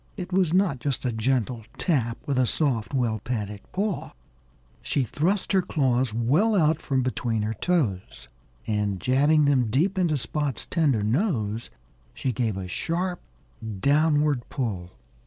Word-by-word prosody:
It 185 -1 -6
was 185 -4 +3
not 180 -7 +2
just 135 0 -2
a 125 - +1
gentle 120 0 0
tap 120 -9 0
with 140 -3 0
a 125 - +3
soft, 130 -7 0
well 120 -5 0
padded 105 -3 -4
paw. 200 0 -2 0.7
She 140 - 0
thrust 175 - 0
her 190 -2 +4
claws 130 -7 +1
well 145 - +2
out 160 -3 +3
from 135 -2 0
between 120 -3 -1
her 110 +1 -1
toes. 115 - -1 0.4
And 105 -3 -1
jabbing 145 - +3
them 130 -5 +3
deep 180 - +1
into 165 -5 +2
Spot's 145 0 -2
tender 145 - +1
nose, 115 - 0 0.5
she 130 - -1
gave 115 -4 -1
a 95 -1 -5
sharp 175 - -2 0.6
downward 145 0 +2
pull. 100 -10 -3
130 Hz, 145 wpm, -25 LUFS, 115-160 Hz, 0.7 s, her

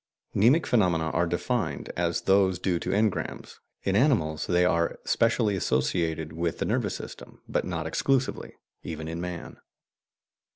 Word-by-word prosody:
"Mnemic 125 +11 +4
phenomena" 85 -8 +2
are 85 - +1
defined 85 0 -2
as 85 -1 0
those 95 -1 +3
due 90 -1 0
to - - -4
engrams; 105 +1 -1 0.2
in 95 - 0
animals, 100 - +2
they 90 0 +3
are 85 -2 +1
specially 115 -3 +2
associated 80 +1 0
with 85 0 -2
the - - -1
nervous - - 0
system, - - -10
but - - -1
not 80 -3 -3
exclusively, 135 +10 0 0.3
even 80 -1 -6
in 85 +1 -4
man. 90 -2 -6
90 Hz, 140 wpm, -27 LUFS, 80-100 Hz, 0.3 s, Mnemic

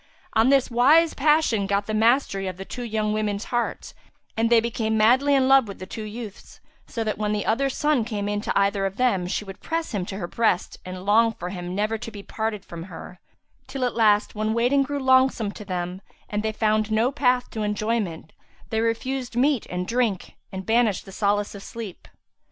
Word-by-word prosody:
On 225 +3 +4
this 270 -2 +3
wise 300 +8 +5
passion 290 -8 +2
got 200 +1 0
the 215 - -4
mastery 220 -3 +2
of 185 -1 -5
the 195 - -7
two 245 +2 -6 0.2
women's 210 -1 -1
hearts 240 -1 -3 0.4
and 225 +1 +1
they 235 -1 +6
became 225 -1 -1
madly 260 +6 +4
in 265 -1 +3
love 270 -3 +5
with 200 - -8
the 185 - -7
two 220 - -7
youths, 215 -1 -9 0.3
so 230 - -3
that 215 -1 -3
when 210 0 0
the 210 - -2
other's 270 +5 0
son 295 -5 +2
came 210 -3 -3
in 205 0 -1
to - - 0
either 200 0 +1
of 195 +1 -8
them, 200 -8 +1
she 210 - -2
would 195 -1 -9
press 330 0 -3
him 205 -5 -2
to 195 - -5
her 195 - -3
breast 200 -1 0
and 185 0 -7
long 225 +2 +4
for 180 -4 -6
him 180 -1 -5
never 215 +2 -1
to 230 - -6
be 205 -2 -10
parted 220 -2 -3
from 170 0 -8
her; 185 -1 -10 0.5
till, 265 -2 -2
at 245 - -1
last, 215 -2 +3
when 215 +1 -1
waiting 250 +4 +3
grew 285 +1 -2
longsome 260 -5 +3
to - - -9
them 180 -1 -4 0.3
and 210 0 -2
they 220 0 -1
found 215 0 +1
no 225 +4 +2
path 250 -3 +1
to 220 - -4
enjoyment, 210 -6 -2 0.4
they 220 0 +1
refused 245 +2 -2
meat 265 0 +2
and 180 0 -3
drink 230 -6 -1 0.2
and 190 0 -6
banished 225 -3 +2
the 195 - -11
solace 205 +1 0
of 200 - -9
sleep. 220 -3 -8
220 Hz, 210 wpm, -24 LUFS, 200-245 Hz, 0.5 s, they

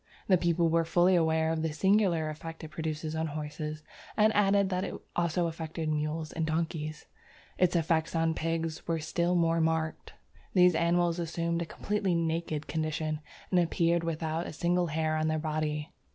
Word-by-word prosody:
The 190 - +6
people 170 -1 +2
were 165 0 +3
fully 175 +2 +3
aware 160 -1 +2
of 160 -1 -1
the 160 0 -1
singular 190 -2 +2
effect 160 +2 -8
it 160 - -7
produced 155 0 -3
on 160 0 -1
horses, 150 0 -5 0.3
and 215 0 +4
added 200 -1 +4
that 185 0 -1
it - - -4 0.2
also 170 0 +1
affected 160 -1 -4
mules 155 +1 -2
and 165 - -2
donkeys. 155 -1 -2 0.5
Its 180 -1 +3
effect 165 0 +1
on 165 0 +2
pigs 165 0 -3
was 165 -2 -1
still 170 +2 +1
more 165 -1 +3
marked. 160 -1 -1 0.4
These 180 -1 +6
animals 170 +1 +2
assumed 170 0 -1
a - - -1
completely 200 -2 -1
naked 165 -2 -1
condition, 155 -1 -2 0.3
and 180 - +4
appeared 170 0 +2
without 165 0 -2
a - - -7
single 175 +2 +1
hair 155 0 0
on 155 0 0
their 155 0 +1
body. 155 -1 -2
165 Hz, 170 wpm, -30 LUFS, 155-170 Hz, 0.5 s, The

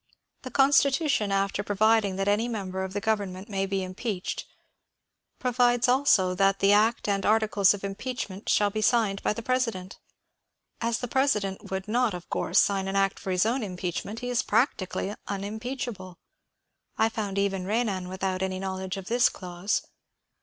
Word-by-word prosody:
The 255 - -7
Constitution, 275 -4 +3
after 195 0 0
providing 205 0 +2
that 195 +1 -2
any 210 +3 +2
member 190 -5 -3
of 190 0 -5
the 205 - -1
govern 205 -3 0
ment 190 +3 -9
may 195 -1 -1
be 195 -1 -1
impeached, 185 +1 -4 0.9
provides 245 -1 +2
also 245 -8 +4
that 195 +1 +2
the 195 +1 +4
act 220 +3 +3
and 200 -1 0
arti 220 +1 +3
cles 205 -2 +3
of 200 - -11
impeachment 200 -1 -5
shall 205 -1 +3
be 215 +1 -2
signed 215 -4 +2
by - - +1
the 230 - -7
President. 230 -7 -2 0.8
As 230 0 0
the 245 - -4
President 215 -8 0
would 190 +1 -4
not 235 -2 +1
of 175 - -10
course - - 0
sign 195 -1 +3
an 195 - -3
act 195 0 +1
for - - -6
his 185 +1 +2
own 245 +4 0
impeachment, 185 +2 -4
he 245 0 -3
is 245 - +2
practically 205 -4 0
unimpeachable. 205 -1 -5 0.8
I 220 - +4
found 210 -3 -4
even 195 -2 0
Renan 200 -4 -1
without 185 0 -2
any 190 0 -1
knowledge 190 0 -4
of 195 - -7
this 240 +4 +3
clause. 180 +2 -3
205 Hz, 170 wpm, -27 LUFS, 190-230 Hz, 0.9 s, also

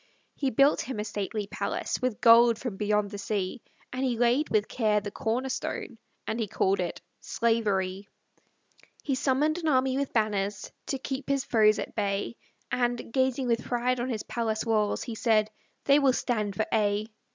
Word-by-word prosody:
He 275 - -1
built 275 +4 +4
him 255 -5 -5
a - - -1
stately 210 0 -3
palace, 200 +4 -3
With 250 -3 -1
gold 235 -1 +7
from 235 -4 -5
beyond 210 0 0
the 205 - -6
sea; 200 +2 -2 0.3
And 255 +1 -2
he 250 -3 0
laid 245 +6 +2
with 215 -1 +1
care 215 -3 +1
the 205 0 -6
corner 245 +6 -2
stone, 255 - -4 0.3
And 225 - -3
he 220 - -1
called 195 0 +1
it 175 -2 -3 0.2
Slavery: 205 -4 0 0.9
He 280 - -1
summoned 285 +5 +1
an 325 - -3
army 265 -2 +2
with 280 - -2
banners, 205 -2 -1 0.2
To 270 - -1
keep 265 +1 -5
his 275 -1 +1
foes 215 -2 +4
at - - -5
bay; 205 0 -2 0.4
And, 240 -2 -1
gazing 260 0 +1
with 235 -1 0
pride 245 +1 0
on 245 +2 -2
his 220 -4 -3
palace 220 -1 -2
walls, 215 -2 +1
He 235 - -5
said, 215 -1 +2 0.3
"They 280 +1 +5
will 275 -3 +4
stand 215 -6 -1
for 220 - 0
aye!" 210 -1 +1
230 Hz, 180 wpm, -28 LUFS, 210-255 Hz, 0.9 s, gold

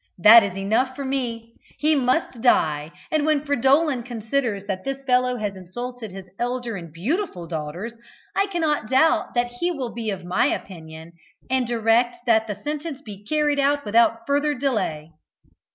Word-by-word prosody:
That 215 +6 +9
is 195 -2 -4
enough 225 +7 0
for 280 - -5
me. 235 -4 -3 0.2
He 305 +1 +3
must 255 -2 0
die; 155 - +2 0.2
and, 310 -1 +2
when 300 -1 +1
Fridolin 280 0 +2
considers 230 -3 -2
that 190 -2 -4
this 275 0 -4
fellow 250 -1 +2
has 205 -3 -3
insulted 235 +5 -7
his 190 0 -9
elder 245 -1 -2
and 170 -4 -8
beautiful 205 - -2
daughters, 165 +7 -5 0.4
I 395 - +2
cannot 315 - -1
doubt 265 +1 +3
that 240 0 +1
he 350 - +1
will 270 -9 -4
be 225 -2 -3
of 190 -3 -4
my 180 +1 +2
opinion, 160 -3 -6 0.4
and 260 -2 +1
direct 240 +1 +1
that 225 -1 +3
the 210 - -3
sentence 295 +6 -5
be 205 -4 -10
carried 295 +3 +1
out 285 +1 +2
without 230 +1 +3
further 290 +1 +1
delay." 200 - -2
240 Hz, 165 wpm, -23 LUFS, 200-275 Hz, 0.4 s, That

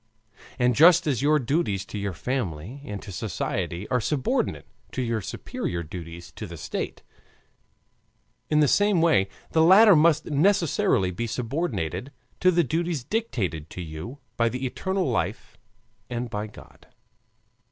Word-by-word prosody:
And 125 -1 +3
just 165 +7 +6
as 135 -6 0
your 150 +2 +4
duties 125 - 0
to 105 - -6
your 100 -1 -2
family 115 - -3
and 105 -1 -5
to 100 - -8
society 90 +1 -3
are 125 -1 +1
subordinate 135 +3 -1 0.3
to 130 - -2
your 115 -2 -1
superior 85 -2 -4
duties 85 +1 -9
to - - -5
the - - -9
state, - - -5 1.5
in 150 0 +4
the 150 - +5
same 205 +3 +3
way 100 - +3 0.2
the 160 - +3
latter 195 +4 +8
must 155 0 +4
necessarily 155 - +2
be 115 +6 -3
subordinated 115 - -3 0.3
to 185 - +5
the 175 -1 +3
duties 165 0 -1
dictated 105 - -2
to 90 - -7
you 80 - -7 0.2
by 115 0 +3
the 125 +3 -4
eternal 190 +8 -1
life 110 -4 -2 0.5
and 120 -1 -4
by 105 0 -3
God. 105 - -16
125 Hz, 145 wpm, -25 LUFS, 100-160 Hz, 1.5 s, latter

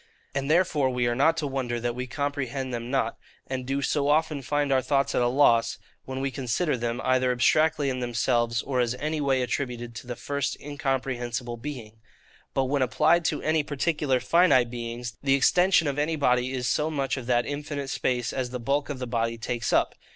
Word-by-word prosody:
And 140 +1 -2
therefore 155 -5 +3
we 125 -1 0
are 120 - +1
not 160 +6 +3
to 155 - -1
wonder 130 -4 -2
that 120 0 -2
we 125 +1 -5
comprehend 135 -1 -3
them 120 0 -4
not, 125 -4 -1 0.3
and 130 -1 -4
do 140 +1 -1
so 140 -1 +1
often 150 -1 +2
find 145 +1 0
our 130 -1 +4
thoughts 140 +1 +1
at - - +2
a 120 - +3
loss, 120 -3 +3 0.3
when 130 0 -4
we 135 - 0
would - - -13
consider 135 +5 0
them, 120 0 -2
either 130 0 +2
abstractly 150 +4 +3
in 130 -1 -1
themselves, 120 -1 0
or 130 -2 -1
as 120 0 +1
any 155 +3 -2
way 135 -2 +2
attributed 120 -1 -3
to 120 - -9
the 120 - -4
first 140 +2 -3
incomprehensible 130 -4 -3
Being. 115 -4 -8 0.6
But 135 - +3
when 140 +1 0
applied 160 +7 +3
to - - -1
any 155 0 +2
particular 145 -2 0
finite 130 -3 +4
beings, 120 0 -5
the 135 -1 +3
extension 175 +4 +4
of 140 0 -1
any 155 +2 0
body 125 -3 +2
is 125 -2 -2
so 150 +5 +1
much 140 -3 -1
of 130 -3 -7
that 120 -1 +2
infinite 145 -1 -4
space 125 -2 -1
as 130 -2 -2
the 125 0 -5
bulk 140 +5 -1
of 145 - -3
the 130 - -4
body 115 -1 -1
takes 115 0 -2
up. - - +2
130 Hz, 205 wpm, -26 LUFS, 120-145 Hz, 0.6 s, our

